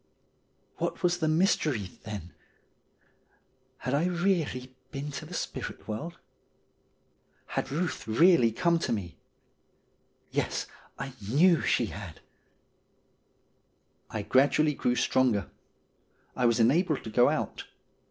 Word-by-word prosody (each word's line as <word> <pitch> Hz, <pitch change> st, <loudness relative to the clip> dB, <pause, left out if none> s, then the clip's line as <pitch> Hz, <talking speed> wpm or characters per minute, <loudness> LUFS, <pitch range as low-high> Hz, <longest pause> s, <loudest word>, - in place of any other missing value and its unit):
What -, -, -3 dB
was 175 Hz, 0 st, +2 dB
the 160 Hz, -, +1 dB
mystery, 155 Hz, -, +1 dB
then? 100 Hz, -6 st, -7 dB, 1.4 s
Had 130 Hz, -, -3 dB
I 145 Hz, +4 st, +2 dB
really 170 Hz, -9 st, -1 dB
been 145 Hz, +1 st, -5 dB
to 140 Hz, -, -6 dB
the -, -, -10 dB
spirit -, -, -5 dB
world? 155 Hz, +11 st, -5 dB, 1.3 s
Had -, -, -3 dB
Buth 160 Hz, 0 st, -3 dB
really 125 Hz, 0 st, +5 dB
come 170 Hz, +7 st, +2 dB
to -, -, -2 dB
me? 95 Hz, -7 st, -4 dB, 1.1 s
Yes, -, -, -1 dB, 0.3 s
I 135 Hz, 0 st, -5 dB, 0.2 s
knew 165 Hz, +7 st, +5 dB
she 120 Hz, -, +2 dB
had. 90 Hz, -5 st, -8 dB, 1.9 s
I 110 Hz, -, -4 dB
gradually 145 Hz, +6 st, +3 dB
grew 125 Hz, -3 st, 0 dB
stronger. 125 Hz, -7 st, +1 dB, 0.8 s
I 125 Hz, -, +3 dB
was 115 Hz, 0 st, +2 dB
enabled 150 Hz, +6 st, +3 dB
to 110 Hz, -, -7 dB
go 120 Hz, +3 st, +5 dB
out. -, -, -3 dB
135 Hz, 115 wpm, -29 LUFS, 115-165 Hz, 1.9 s, really